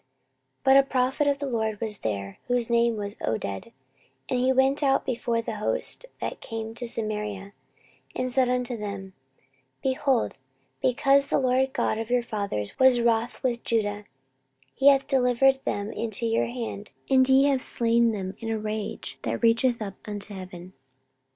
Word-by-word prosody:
14:028:009 - - -47 0.5
But 265 0 +6
a 275 - +7
prophet 265 +3 +1
of 285 -1 +2
the 285 - -4
LORD 220 -5 -2
was 215 -3 -3
there, 100 -2 -4
whose 245 -1 +1
name 235 -1 +3
was 205 0 -4
Oded: 110 - -3 0.6
and 250 - +1
he 255 +1 +3
went 265 +2 +3
out 270 -2 +2
before 235 -2 -1
the 220 - -4
host 215 - 0
that - - -5
came 225 -1 -5
to 240 +1 -5
Samaria, 210 -3 -2 0.6
and 255 -1 -2
said 255 -1 +3
unto 250 0 0
them, 200 -3 -6 0.7
Behold, 260 - 0 0.4
because 275 +2 +3
the - - +1
LORD 260 0 +1
God 215 - 0
of 225 0 -4
your 245 0 +2
fathers 200 - -3
was 260 -2 +6
wroth 235 +1 0
with 240 -2 -1
Judah, 210 -2 -1 0.7
he 270 - +2
hath 275 -1 +6
delivered 265 0 +3
them 205 +1 -2
into 230 0 -3
your 225 0 +1
hand, 230 -4 -6 0.2
and 260 -1 +4
ye 265 +1 +6
have 275 -2 +2
slain 235 -1 +2
them 190 -3 -4
in 225 - -5
a 225 - 0
rage 215 -1 -5
that - - -3
reacheth 235 +1 +3
up 200 -2 -6
unto 205 0 -6
heaven. 185 -1 -9
235 Hz, 170 wpm, -26 LUFS, 210-260 Hz, 0.7 s, a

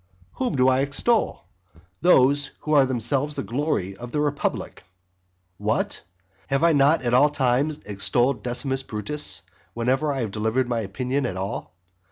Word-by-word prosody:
Whom 250 - 0
do 130 -1 +3
I 130 0 +4
extol? 145 - +1 0.6
Those 145 -4 +4
who 155 - -2
are 140 -3 +5
themselves 130 +4 -1
the 135 - -3
glory 120 - -2
of 120 +3 -9
the 150 - -1
republic. 145 -1 -2 0.8
What? - - -1 0.5
have 135 +3 0
I 170 -1 +5
not 145 +1 +4
at 120 -1 0
all 145 +4 +6
times 140 +2 +1
extolled 105 +5 +1
Decimus 130 +2 -1
Brutus 105 -3 -3 0.3
whenever 130 +5 +1
I 135 -2 -2
have 110 -4 -3
delivered 110 +4 0
my 120 -1 -1
opinion 125 +6 -2
at 95 - -5
all? 95 -1 -5
130 Hz, 155 wpm, -24 LUFS, 120-145 Hz, 0.8 s, all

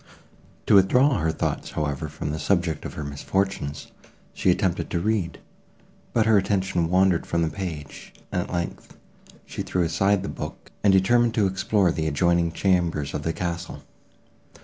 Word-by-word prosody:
To - - +3
withdraw 125 +8 +5
her 80 0 +1
thoughts, 80 - -3
however, 75 -1 -2
from 75 -1 -5
the 80 - -3
subject 85 -5 0
of - - -6
her 75 - -4
misfortunes, 70 +1 -3 0.4
she - - +1
attempted 90 0 +1
to 85 - -1
read, 100 -2 -1 0.7
but 115 -2 +2
her 110 -2 +5
attention 95 -3 0
wandered 90 -1 +3
from 85 0 0
the 80 - 0
page, 80 -8 -7 0.2
and, - - 0
at - - -7
length, 85 -1 -5 0.5
she - - -6
threw 90 - 0
aside 95 +4 +1
the - - -4
book, - - -7
and 100 - +5
determined 115 +5 +3
to 105 -4 +3
explore 95 0 +1
the 80 -1 -2
adjoining 85 +2 +2
chambers 85 -7 0
of - - -2
the 80 - -1
castle. 85 0 -4
90 Hz, 165 wpm, -24 LUFS, 80-95 Hz, 0.7 s, withdraw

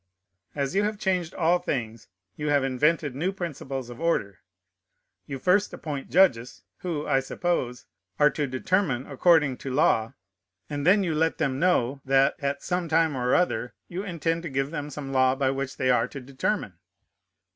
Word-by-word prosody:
As 140 -1 -1
you 200 - +3
have 210 0 -1
changed 180 -4 -1
all 175 +1 +3
things, 115 - -4 0.3
you 150 +6 -3
have 145 -2 +3
invented 145 +2 +1
new 165 +8 -1
principles 135 -9 -5
of 120 - -10
order. 100 - 0 0.9
You 135 - -4
first 185 +9 +2
appoint 145 -4 -5
judges, 130 -10 +2 0.2
who, 165 -5 -3
I 135 -2 +2
suppose, 135 -3 -2 0.3
are 150 0 +5
to 145 -2 -2
determine 135 0 0
according 150 -2 +3
to 135 - -6
law, 115 -5 +2 0.5
and 145 +1 -3
then 200 +2 +5
you 170 -4 -1
let 160 +1 +1
them 135 -1 -1
know, 140 -7 +1
that, 135 +1 +3
at 140 0 -2
some 180 -2 -2
time 160 -2 +2
or 125 -1 +1
other, 125 - 0
you 180 +2 -4
intend 170 -3 -2
to 170 - -5
give 135 +1 -1
them 150 -3 -4
some 140 -1 -6
law 130 0 +4
by 135 -1 +1
which 135 0 -4
they 130 - +2
are 125 - +2
to 140 - -8
determine. 130 - -3
145 Hz, 175 wpm, -26 LUFS, 130-170 Hz, 0.9 s, are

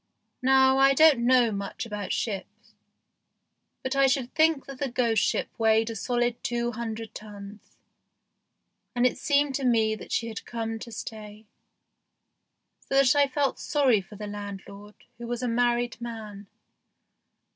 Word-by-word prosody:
Now 265 +1 +4
I 275 0 +5
don't 310 -3 +6
know 250 -3 +4
much 200 +3 -5
about 210 -3 -5
ships, 205 -4 -4 1.1
but 260 +1 -2
I 275 0 +5
should 260 -2 -1
think 315 -3 +2
that 275 -2 -10
that 270 -4 -3
ghost 230 -4 +2
ship - - 0
weighed 225 0 +3
a - - -6
solid 240 +2 -1
two 240 0 -1
hundred 225 -1 -6
tons, 205 -1 -11 1.2
and 245 0 +2
it 255 - +1
seemed 285 -1 +2
to 270 - -2
me 225 -3 +3
that 215 - -9
she 235 - 0
had 220 -3 -6
come 225 -1 -4
to 235 - -9
stay, 215 -1 -8 1.3
so - - -5
that 275 0 +5
I 285 -1 +4
felt 275 0 -1
sorry 265 -8 +2
for 200 +3 -14
landlord, 205 0 -8 0.2
who 235 - -7
was 240 +1 -3
a - - 0
married 240 0 0
man. 215 -4 -8
235 Hz, 150 wpm, -26 LUFS, 215-260 Hz, 1.3 s, don't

